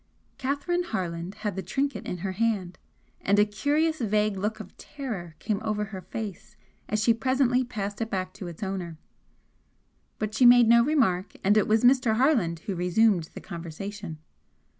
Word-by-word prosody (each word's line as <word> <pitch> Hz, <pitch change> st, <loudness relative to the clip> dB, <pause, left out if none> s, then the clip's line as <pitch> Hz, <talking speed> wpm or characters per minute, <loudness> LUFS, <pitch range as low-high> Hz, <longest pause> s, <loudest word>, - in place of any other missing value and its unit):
Catherine 285 Hz, +7 st, -1 dB
Harland 180 Hz, -, -4 dB
had 205 Hz, -, -1 dB
the 190 Hz, -, -3 dB
trinket 270 Hz, +10 st, -2 dB
in 180 Hz, -, -3 dB
her 190 Hz, -, -1 dB
hand, 195 Hz, -3 st, -1 dB, 0.4 s
and 200 Hz, +1 st, +2 dB
a 205 Hz, -, +6 dB
curious 295 Hz, +10 st, 0 dB
vague 210 Hz, -1 st, +1 dB
look 210 Hz, +3 st, -2 dB
of 215 Hz, -, -10 dB
terror 215 Hz, -, -7 dB
came 215 Hz, -1 st, -2 dB
over 210 Hz, -1 st, -1 dB
her 195 Hz, -2 st, -7 dB
face 210 Hz, 0 st, -7 dB, 0.3 s
as 215 Hz, 0 st, 0 dB
she 230 Hz, -, +5 dB
presently 255 Hz, +1 st, +2 dB
passed 205 Hz, -3 st, -5 dB
it 225 Hz, -, -2 dB
back 185 Hz, -2 st, -3 dB
to 185 Hz, -, -8 dB
its 170 Hz, +3 st, -7 dB
owner. 185 Hz, -4 st, -4 dB, 1.2 s
But 215 Hz, -1 st, -3 dB
she 235 Hz, -, +2 dB
made 245 Hz, -1 st, +8 dB
no 235 Hz, +1 st, +6 dB
remark 215 Hz, -10 st, +1 dB
and 200 Hz, +2 st, +4 dB
it 215 Hz, -, +3 dB
was 220 Hz, +1 st, +3 dB
Mr. 245 Hz, -3 st, +4 dB
Harland 220 Hz, -, +2 dB
who 195 Hz, -, -4 dB
resumed 180 Hz, +1 st, +2 dB
the -, -, -7 dB
conversation. 170 Hz, +2 st, -7 dB
210 Hz, 170 wpm, -27 LUFS, 190-240 Hz, 1.2 s, made